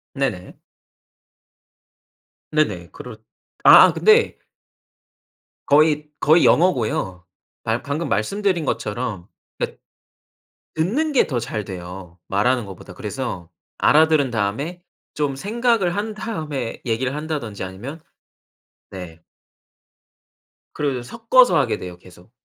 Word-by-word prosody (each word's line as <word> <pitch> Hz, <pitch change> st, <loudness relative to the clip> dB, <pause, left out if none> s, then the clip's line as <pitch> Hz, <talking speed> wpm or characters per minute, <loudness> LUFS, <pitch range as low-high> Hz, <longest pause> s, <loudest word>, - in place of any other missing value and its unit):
네네. 130 Hz, -10 st, -3 dB, 2.0 s
네네. 105 Hz, -, 0 dB
그렇 125 Hz, -3 st, -10 dB, 0.5 s
아아 -, -, +9 dB
근데 440 Hz, +1 st, +4 dB, 1.3 s
거의 150 Hz, 0 st, +3 dB
거의 160 Hz, +3 st, +5 dB
영어고요. 110 Hz, -, +1 dB, 0.4 s
발 115 Hz, +1 st, -1 dB
방금 145 Hz, +4 st, -3 dB
말씀드린 185 Hz, -, 0 dB
것처럼. 105 Hz, -6 st, -3 dB, 0.3 s
그러니깐 -, -, -4 dB, 0.9 s
듣는 235 Hz, -, 0 dB
게 270 Hz, -, +4 dB
더 130 Hz, -5 st, -1 dB
잘 110 Hz, -2 st, -4 dB
돼요 90 Hz, -2 st, -9 dB
말하는 120 Hz, +4 st, +1 dB
것보다. 95 Hz, -2 st, -11 dB
그래서 85 Hz, -2 st, -5 dB, 0.3 s
알아들은 155 Hz, -4 st, +4 dB
다음에 115 Hz, -, -2 dB, 0.3 s
좀 145 Hz, -2 st, -1 dB
생각을 215 Hz, -, 0 dB
한 215 Hz, +2 st, -2 dB
다음에 155 Hz, -, -5 dB
얘기를 125 Hz, +2 st, -1 dB
한다든지 150 Hz, -10 st, -4 dB
아니면 115 Hz, -, -8 dB, 0.9 s
네. 85 Hz, -4 st, -9 dB, 1.5 s
그리고 140 Hz, -4 st, -1 dB
섞어서 230 Hz, -, +4 dB
하게 120 Hz, -7 st, +1 dB
돼요 90 Hz, -1 st, -8 dB
계속. 90 Hz, +3 st, -18 dB
135 Hz, 230 characters per minute, -21 LUFS, 100-165 Hz, 2.0 s, 아아